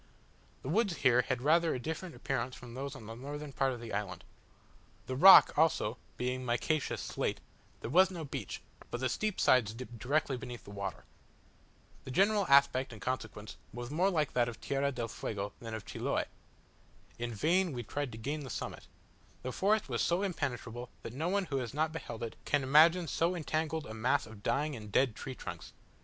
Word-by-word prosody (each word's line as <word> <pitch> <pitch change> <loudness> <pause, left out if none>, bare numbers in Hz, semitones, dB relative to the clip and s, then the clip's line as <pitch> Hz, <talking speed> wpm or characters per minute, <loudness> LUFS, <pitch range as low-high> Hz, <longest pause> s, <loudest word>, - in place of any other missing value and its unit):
The 130 - -4
woods 200 +1 +2
here 125 0 +5
had 125 0 -2
rather 165 +3 +4
a - - -3
different 160 +6 -5
appearance 130 -1 -2
from 120 -1 -11
those 140 +2 -5
on 115 - -10
the 115 - -7
northern 145 +4 -7
part 135 0 +1
of 125 - -5
the 115 -2 -7
island. 100 -1 -3 0.8
The 130 - -3
rock, 190 +8 +9
also, 150 -7 +2 0.2
being 125 +1 -2
micaceous 125 +5 0
slate, - - -2 0.4
there - - -4
was 185 +4 +6
no 170 -4 -6
beach, 140 - -6 0.3
but 120 - -4
the 130 - +1
steep 215 - -1
sides 110 -4 +4
dipped 120 -1 -8
directly 140 +2 0
beneath 120 0 -8
the - - -11
water. 100 -1 -5 1.0
The - - -9
general 200 +7 +3
aspect 140 -2 +5
in 110 - -10
consequence 105 -7 -4
was 120 +2 -6
more 180 +6 +3
like 155 -6 0
that 120 -1 +2
of 115 - -9
Tierra 140 0 0
del 120 -3 -3
Fuego 100 -2 -4
than 115 -1 -6
of 110 - -7
Chiloe. - - -1 0.9
In 120 0 -2
vain 170 - +2
we 120 -3 -4
tried 145 +3 -3
to 110 - -8
gain 140 +7 -3
the 140 -3 -7
summit: - - -5 0.6
the 130 - -3
forest 210 +8 +2
was - - -1
so 175 +3 +1
impenetrable, 125 - -3
that 115 - -6
no 160 +7 -1
one 200 0 +1
who 140 -5 -2
has 125 0 -4
not 155 +1 +1
beheld 120 -8 -6
it 115 - -5
can 145 -2 +1
imagine 160 +6 +6
so 170 +4 +1
entangled 160 -1 -2
a 110 - -7
mass 125 +5 +1
of 110 -2 -12
dying 140 +7 0
and 105 -3 -9
dead 125 0 +3
trunks. 130 -2 -7
130 Hz, 195 wpm, -32 LUFS, 120-160 Hz, 1.0 s, rock